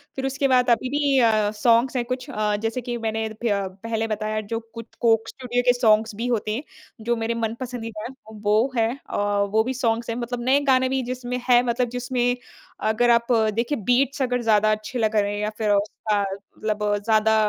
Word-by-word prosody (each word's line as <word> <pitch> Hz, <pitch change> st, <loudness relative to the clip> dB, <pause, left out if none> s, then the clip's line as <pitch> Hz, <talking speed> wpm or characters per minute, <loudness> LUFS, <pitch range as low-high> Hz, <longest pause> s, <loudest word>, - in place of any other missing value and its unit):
फिर 265 Hz, -, -3 dB
उसके 270 Hz, +1 st, 0 dB
बाद 250 Hz, -2 st, +3 dB
अभी 240 Hz, +2 st, +2 dB
भी 285 Hz, -1 st, +2 dB
अ, 215 Hz, -3 st, +3 dB
सॉन्ग्स 235 Hz, +3 st, +3 dB
हैं 245 Hz, -, +1 dB
कुछ 255 Hz, +1 st, -4 dB
अ, 210 Hz, 0 st, 0 dB
जैसे 225 Hz, +3 st, -1 dB
कि 240 Hz, 0 st, -4 dB
मैंने 220 Hz, 0 st, -1 dB, 0.2 s
फ्य 205 Hz, -4 st, +1 dB, 0.3 s
पहले 225 Hz, 0 st, -1 dB
बताया 215 Hz, 0 st, -2 dB
जो 225 Hz, -, 0 dB
कुछ 230 Hz, 0 st, -8 dB
कोक 225 Hz, -1 st, +3 dB
स्टूडियो 245 Hz, -2 st, -2 dB
के 245 Hz, -, +6 dB
सॉन्ग्स 220 Hz, -2 st, +3 dB
भी 230 Hz, +4 st, -3 dB
होते 220 Hz, -3 st, -1 dB
हैं, 265 Hz, -, -4 dB, 0.4 s
जो 235 Hz, +2 st, 0 dB
मेरे 225 Hz, 0 st, -1 dB
मनपसंदीदा 230 Hz, -2 st, -5 dB
हैं, 265 Hz, -, -12 dB, 0.3 s
वो 215 Hz, +6 st, +2 dB
हैं 225 Hz, -1 st, +3 dB, 0.2 s
अ, -, -, -3 dB, 0.4 s
वो 220 Hz, 0 st, +4 dB
भी 255 Hz, +3 st, -2 dB
सॉन्ग्स 235 Hz, -2 st, -1 dB
हैं। 230 Hz, -, -1 dB
मतलब 245 Hz, 0 st, -4 dB
नए 265 Hz, +2 st, +4 dB
गाने 260 Hz, 0 st, +3 dB
भी 265 Hz, 0 st, 0 dB
जिसमें 250 Hz, 0 st, -4 dB
हैं 245 Hz, -1 st, +7 dB
मतलब 245 Hz, 0 st, 0 dB
जिसमें 245 Hz, 0 st, 0 dB, 0.5 s
अगर 240 Hz, +2 st, +2 dB
आप 235 Hz, +1 st, +2 dB, 0.2 s
देखें 235 Hz, +2 st, -2 dB
बीट्स 270 Hz, +3 st, +2 dB
अगर 250 Hz, -1 st, 0 dB
ज़्यादा 215 Hz, -2 st, +3 dB
अच्छे 215 Hz, +3 st, -3 dB
लगा 220 Hz, -1 st, +2 dB
रहे 205 Hz, 0 st, 0 dB
हैं 205 Hz, -, -3 dB
या 210 Hz, -, 0 dB
फिर 215 Hz, -2 st, 0 dB
उसका 205 Hz, +1 st, 0 dB
मतलब 210 Hz, +2 st, -5 dB, 0.2 s
ज़्यादा 220 Hz, 0 st, +3 dB
230 Hz, 205 wpm, -23 LUFS, 215-250 Hz, 0.5 s, हैं